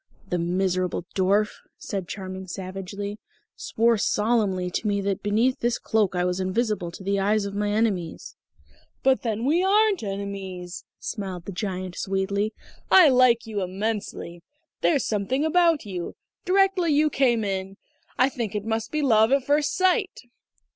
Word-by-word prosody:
"That 180 - 0
miserable 180 0 -1
dwarf," 200 +3 +2 0.3
said 195 -3 -5
Charming 190 -1 -6
savagely, 195 +3 -6 0.4
"swore 230 0 +1
solemnly 210 -5 +1
to 215 - -2
me 200 -1 +1
that 195 -1 -2
beneath 225 +5 +1
this 240 0 0
cloak 210 -4 0
I 180 0 +1
was 180 +1 -1
invisible 195 -1 -1
to 175 - -10
the 200 +1 0
eyes 205 +1 +1
of 200 - -5
my 205 0 -1
enemies!" 205 -6 -1 0.7
"But 265 -1 +3
then 225 0 -2
we 330 +6 +3
aren't 415 +1 +3
enemies," 195 -3 -6
smiled 190 -5 -5
the - - -5
Giant 185 -2 -4
sweetly. 200 +2 -1 0.4
"I 360 -5 +8
like 250 -3 +4
you 215 -3 -3
immensely. 190 -2 -4 0.4
There's 290 -5 +2
something 230 +8 0
about 330 -3 +3
you 180 -4 -5 0.3
directly 380 -2 +3
you 300 +1 +3
came 240 -5 +2
in.... 195 -1 -3 0.4
I 255 - +5
think 235 -6 -4
it 205 0 -3
must 225 0 -2
be 305 -1 -1
love 220 -3 +4
at 275 -1 +2
first 290 +1 +2
sight." 375 +2 +1
210 Hz, 155 wpm, -25 LUFS, 190-245 Hz, 0.7 s, I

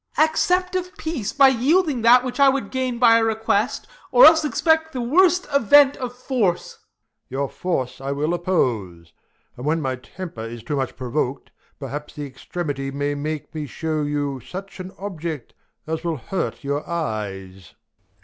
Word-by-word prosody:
Ben. 310 - +6
Accept 360 +3 0
of 365 0 -3
peace 295 -11 -3
by 275 -2 +6
yielding 275 +2 +2
that 245 +2 +6
which 255 +2 -5
I 280 -1 +7
Would 265 -6 -2
gain 255 -2 -2
by 230 -1 +6
a - - +1
request, 220 -1 0 0.3
or - - +8
else 320 0 +7
expect 320 +3 +1
The 255 - -3
worst 360 +8 +3
event 280 +2 +6
of 250 -2 -5
force. 240 -9 -1
Prov. - - -37 0.5
Your 135 +2 -2
force 135 -6 -3
I 135 +1 -3
will 150 +4 -1
Oppose; 110 - -1 0.4
and 125 - -9
when 155 +3 +1
my 130 -4 -2
temper 145 +1 -9
is 115 0 -7
too 145 - -3
much 135 -2 -2
Provok'd, 130 +1 -3 0.3
perhaps 145 +2 -7
the 145 - -5
extremity 135 0 -5
may 145 +1 -2
make 150 +1 -5
Me 155 -2 -4
shew 155 +2 -2
you 145 -2 -2
such 195 +9 -9
an 185 0 -7
object, 165 - -6 0.3
as 160 0 -4
will 165 -2 -2
hurt 170 +6 -4
Your 140 +1 -2
eyes. 95 - -5
170 Hz, 170 wpm, -22 LUFS, -, 0.5 s, or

